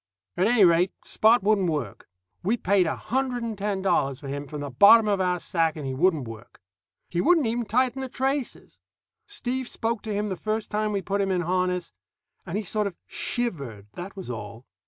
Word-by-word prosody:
At 185 - +2
any 225 -4 +5
rate, 175 +2 +4
Spot 220 0 +4
wouldn't 200 -3 +2
work. 140 -10 -4 0.3
We 215 +7 +1
paid 195 -4 +2
a - - -1
hundred 255 -1 -2
and 230 -2 -3
ten 200 -1 -2
dollars 135 -8 +1
for 140 - -9
him 140 +1 -5
from 150 +1 -6
the 145 -1 -5
bottom 210 - +7
of 200 -2 +1
our 180 -1 +1
sack, 165 -2 0
and 150 -3 -6
he 135 - -2
wouldn't 155 -2 +1
work. 115 +1 -11 0.5
He 175 - -1
wouldn't 330 -4 +4
even 235 +1 -1
tighten 255 +4 +1
the 265 - -4
traces. 270 +1 -3 0.5
Steve 260 -11 -3
spoke 225 -1 -2
to 220 - -5
him 205 +1 -1
the 190 - -2
first 215 +3 -3
time 215 0 0
we 200 -2 -2
put 200 0 -1
him 195 - 0
in 185 -2 +1
harness, 180 - -1 0.5
and 180 - -2
he 215 - -2
sort 210 +2 0
of 190 - -7
shivered, 140 - -4
that 180 +3 -8
was 190 -10 -6
all. 110 +1 -8
195 Hz, 205 wpm, -26 LUFS, 165-225 Hz, 0.5 s, bottom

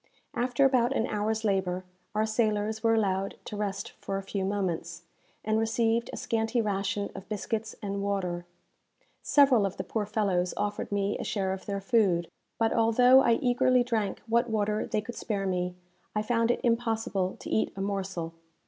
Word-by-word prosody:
After 250 +2 +2
about 255 -1 +3
an 225 - +1
hour's 220 0 -1
labour, 190 -3 0 0.3
our 215 +1 +2
sailors 215 -1 0
were 225 0 +3
allowed 195 -3 0
to - - -6
rest 205 +1 -3
for 195 - -2
a 195 - -4
few 195 0 -3
moments, 180 -4 -2 0.4
and 215 +1 +2
received 225 +1 +1
a - - -6
scanty 225 +1 0
ration 200 -1 -1
of 190 - -10
biscuits 215 +1 -3
and 200 -1 -2
water. 180 -3 -2 0.7
Several 270 -7 +5
of 195 -2 -2
the 185 - -3
poor 210 +2 -2
fellows 195 -4 0
offered 205 0 -2
me 200 0 0
a - - -3
share 190 -2 -1
of 190 - -8
their 200 -1 -2
food; 195 -6 +2 0.3
but, 225 -1 +2
although 245 +3 +6
I 235 - +4
eagerly 250 0 +4
drank 220 -5 -1
what 235 +2 +2
water 215 -1 0
they 215 - 0
could 240 +3 -7
spare 200 -4 -3
me, 180 -1 -1 0.4
I 210 - +1
found 230 0 +1
it 240 - +1
impossible 225 -5 0
to - - -8
eat 220 - +1
a 195 - -4
morsel. 195 -4 -3
210 Hz, 175 wpm, -28 LUFS, 195-225 Hz, 0.7 s, although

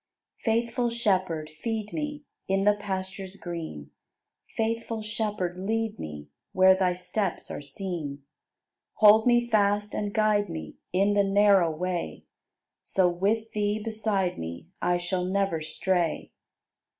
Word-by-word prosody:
77. 230 +1 +2
Faithful 240 +1 -1
Shepherd, 185 -9 0
feed 220 -2 -3
me 295 -1 -4 0.2
In 195 0 +1
the 210 +1 +5
pastures 190 -1 -5
green; 160 - -7 0.7
Faithful 225 0 -1
Shepherd, 210 -4 -2
lead 220 +2 -1
me 75 -1 -7 0.3
Where 185 0 +6
Thy 185 -1 +1
steps 180 +1 -3
are - - -5
seen. 145 -2 -5 0.7
Hold 215 +2 +7
me 240 -1 +4
fast 205 -2 +2
and 205 -1 -2
guide 210 -2 +2
me 80 -1 -7
In 195 +3 +3
the 205 0 +4
narrow 195 -3 +5
way; 175 +2 -3 0.6
So, 180 -2 +2
with 220 +5 0
Thee 210 0 0
beside 215 -4 -1
me, 85 - -7
I 175 0 +2
shall 180 +1 -2
never 190 -3 0
stray. 170 +2 -1
195 Hz, 130 wpm, -27 LUFS, 175-215 Hz, 0.7 s, Hold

